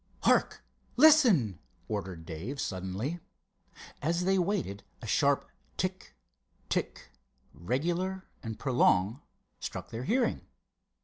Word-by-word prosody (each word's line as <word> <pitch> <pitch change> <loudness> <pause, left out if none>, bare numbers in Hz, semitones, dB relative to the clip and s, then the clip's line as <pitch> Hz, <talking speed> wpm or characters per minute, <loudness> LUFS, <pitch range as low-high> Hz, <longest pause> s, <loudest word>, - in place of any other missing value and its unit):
"Hark—listen!" 240 - +4 0.3
ordered 85 -3 -4
Dave, 95 - -5
suddenly. 100 - -3 0.8
As 170 +4 0
they 190 0 +3
waited 175 - -1 0.2
a - - -9
sharp - - +2 0.3
tick—tick, - - -5 0.4
regular 175 - -2 0.2
and 110 -1 -5
prolonged, 120 -4 +3 0.4
struck - - -6
their 115 +3 -4
hearing. 245 - +1
135 Hz, 85 wpm, -30 LUFS, -, 0.8 s, Hark—listen